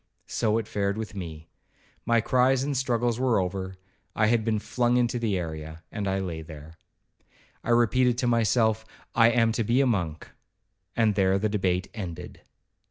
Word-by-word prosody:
—So 110 Hz, -1 st, 0 dB
it 115 Hz, -2 st, -3 dB
fared 100 Hz, 0 st, -1 dB
with 110 Hz, -2 st, -5 dB
me; 80 Hz, -5 st, -7 dB, 0.6 s
my 115 Hz, -1 st, +4 dB
cries 130 Hz, +2 st, +3 dB
and 140 Hz, 0 st, -2 dB
struggles 120 Hz, -2 st, 0 dB
were 125 Hz, -5 st, +2 dB
over,—I 95 Hz, +3 st, -4 dB
had 115 Hz, 0 st, +2 dB
been 110 Hz, -1 st, +1 dB
flung 120 Hz, +3 st, +1 dB
into 120 Hz, 0 st, +1 dB
the 110 Hz, -5 st, 0 dB
area, 80 Hz, -1 st, -6 dB
and 105 Hz, -3 st, -3 dB
I 95 Hz, 0 st, 0 dB
lay 90 Hz, -4 st, -4 dB
there. 80 Hz, 0 st, -12 dB, 0.8 s
I -, -, -6 dB
repeated 120 Hz, +1 st, +3 dB
to 125 Hz, -, 0 dB
myself, 110 Hz, -1 st, +2 dB, 0.3 s
'I 115 Hz, 0 st, +6 dB
am 115 Hz, -1 st, +3 dB
to 115 Hz, -, -1 dB
be 120 Hz, +4 st, +2 dB
a 140 Hz, -, +4 dB
monk,' 85 Hz, -10 st, -2 dB, 0.6 s
and 110 Hz, -2 st, +3 dB
there 95 Hz, -1 st, +2 dB
the 105 Hz, +2 st, 0 dB
debate 95 Hz, -3 st, 0 dB
ended. 90 Hz, -7 st, -7 dB
110 Hz, 165 wpm, -26 LUFS, 95-120 Hz, 0.8 s, I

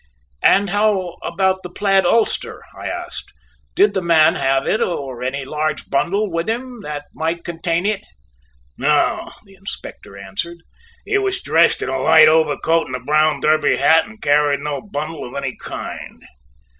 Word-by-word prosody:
"And 200 Hz, -1 st, +4 dB
how 200 Hz, -4 st, 0 dB
about 190 Hz, +1 st, 0 dB
the 180 Hz, -, -8 dB
plaid 195 Hz, 0 st, +2 dB
ulster," 230 Hz, +4 st, +2 dB
I -, -, -7 dB
asked; -, -, -6 dB, 0.4 s
"did 205 Hz, -1 st, +4 dB
the 190 Hz, -, -1 dB
man 165 Hz, -2 st, +4 dB
have 135 Hz, -4 st, 0 dB
it 215 Hz, -, 0 dB
or 135 Hz, -8 st, -3 dB
any 130 Hz, +2 st, -3 dB
large 155 Hz, +1 st, -3 dB
bundle 195 Hz, +8 st, 0 dB
with 165 Hz, +4 st, -2 dB
him 245 Hz, +1 st, -4 dB
that 150 Hz, -2 st, -6 dB
might 165 Hz, +2 st, -3 dB
contain 170 Hz, +1 st, -2 dB
it?" 210 Hz, -1 st, 0 dB, 0.8 s
"No," -, -, +1 dB
the 195 Hz, -, -19 dB
Inspector 190 Hz, -, -9 dB
answered, 100 Hz, -, -5 dB, 0.5 s
"he 405 Hz, -1 st, +1 dB
was 390 Hz, -1 st, 0 dB
dressed 165 Hz, +2 st, +3 dB
in -, -, -3 dB
a 130 Hz, 0 st, -2 dB
light 155 Hz, +3 st, +6 dB
overcoat 160 Hz, +1 st, +2 dB
and 130 Hz, -, -5 dB
a -, -, -4 dB
brown 150 Hz, +2 st, +1 dB
derby 155 Hz, 0 st, +3 dB
hat, 160 Hz, +5 st, +4 dB
and 220 Hz, 0 st, -15 dB
carried 145 Hz, -2 st, +2 dB
no 145 Hz, -1 st, -3 dB
bundle 155 Hz, -6 st, -5 dB
of 125 Hz, -, -9 dB
any 135 Hz, -2 st, -3 dB
kind." -, -, -8 dB
165 Hz, 165 wpm, -19 LUFS, 145-195 Hz, 0.8 s, light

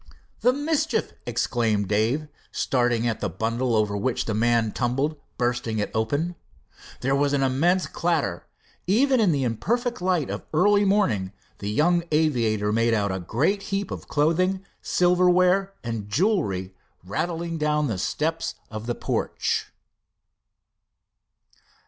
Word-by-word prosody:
"The 250 Hz, -, +4 dB
mischief!" 305 Hz, +3 st, -1 dB
exclaimed 115 Hz, -3 st, 0 dB
Dave, 115 Hz, +9 st, +1 dB, 0.2 s
starting 120 Hz, -2 st, +1 dB
at 115 Hz, -, -1 dB
the -, -, -2 dB
bundle 115 Hz, +2 st, -1 dB
over 105 Hz, -1 st, +1 dB
which 115 Hz, +5 st, -1 dB
the 110 Hz, -, -2 dB
man 115 Hz, 0 st, +2 dB
tumbled, 135 Hz, +7 st, -1 dB, 0.2 s
bursting 120 Hz, -2 st, -1 dB
it 105 Hz, -, -2 dB
open. 145 Hz, +11 st, 0 dB, 0.7 s
There 135 Hz, +2 st, +1 dB
was 145 Hz, 0 st, +1 dB
an 140 Hz, -1 st, +2 dB
immense 165 Hz, +8 st, +2 dB
clatter. 160 Hz, -, -1 dB, 0.4 s
Even 255 Hz, +7 st, +3 dB
in 205 Hz, -6 st, +4 dB
the 140 Hz, -3 st, 0 dB
imperfect 235 Hz, -, -1 dB
light 180 Hz, -5 st, +1 dB
of -, -, -4 dB
the 155 Hz, -, -6 dB
early 205 Hz, +3 st, +4 dB
morning, 120 Hz, -, +1 dB, 0.3 s
the 100 Hz, -, -4 dB
young 170 Hz, +10 st, +3 dB
aviator 115 Hz, -9 st, +1 dB
made 115 Hz, +1 st, +2 dB
out 100 Hz, -2 st, 0 dB
a 95 Hz, -, -2 dB
great 140 Hz, -, 0 dB
heap 200 Hz, 0 st, -2 dB
of -, -, -6 dB
clothing, 185 Hz, +6 st, +1 dB, 0.2 s
silverware 180 Hz, +2 st, +3 dB
and 115 Hz, -4 st, -4 dB
jewelry, 105 Hz, -, 0 dB, 0.3 s
rattling 165 Hz, -, -3 dB
down 150 Hz, 0 st, +1 dB
the 110 Hz, -9 st, -2 dB
steps 160 Hz, -, -1 dB, 0.2 s
of 110 Hz, +1 st, -6 dB
the 120 Hz, -, -1 dB
porch. -, -, -2 dB
140 Hz, 135 wpm, -25 LUFS, 110-180 Hz, 0.7 s, The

